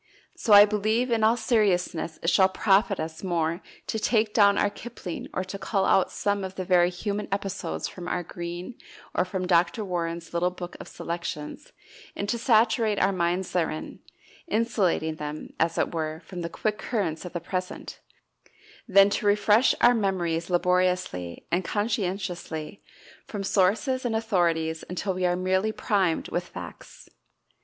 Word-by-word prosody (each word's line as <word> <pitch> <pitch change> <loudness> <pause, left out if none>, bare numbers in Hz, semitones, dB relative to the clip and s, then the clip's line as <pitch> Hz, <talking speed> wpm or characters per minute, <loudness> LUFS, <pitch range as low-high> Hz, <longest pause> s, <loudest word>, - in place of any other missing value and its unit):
So 220 - -2
I 205 0 +11
believe, 215 +4 0
in 225 -2 +2
all 225 +2 +4
seriousness, 185 -8 +1
it 165 - +2
shall 190 +2 +5
profit 195 +1 +2
us 160 +2 -5
more 170 -1 -1 0.2
to 220 - -2
take 220 -1 +1
down 200 -2 +5
our 205 - +2
Kipling 205 -6 -7
or 185 - -2
to 190 +1 -7
cull 195 0 0
out 190 - +3
some 200 -1 -1
of 190 0 -6
the 185 - -4
very 175 -1 +4
human 205 +3 -3
episodes 195 0 -3
from 180 -1 -8
our 180 0 -1
Green, 175 +5 -6 0.4
or - - +2
from 185 0 -3
Dr. 180 +5 +2
Warren's 170 -2 -3
little 175 +1 +2
book 180 -1 -8
of - - -9
selections, 170 - -6 0.4
and 200 - -3
to 235 - 0
saturate 225 -2 +3
our 195 - +3
minds 180 0 -1
therein 160 -3 -2 0.5
insulating 195 - 0
them, 150 0 -6
as 165 +1 +1
it - - 0
were, 160 0 -3
from 180 -2 -7
the 170 - -3
quick 215 +4 -2
currents 185 -10 -2
of 180 - -8
the 175 - -2
present 185 +2 -5 0.9
than 200 -1 +6
to 205 - 0
refresh 210 +4 +4
our 240 +1 +7
memories 175 -6 -1
laboriously 180 - 0
and 175 +2 +1
conscientiously 190 -5 -3 0.5
from 205 -2 -5
sources 215 +8 +1
and 235 -3 -1
authorities 170 -7 0
until 185 +2 -2
we 180 0 0
are 175 - +1
merely 190 +3 +1
primed 195 -6 0
with - - -2
facts. - - -10
185 Hz, 160 wpm, -26 LUFS, 175-210 Hz, 0.9 s, I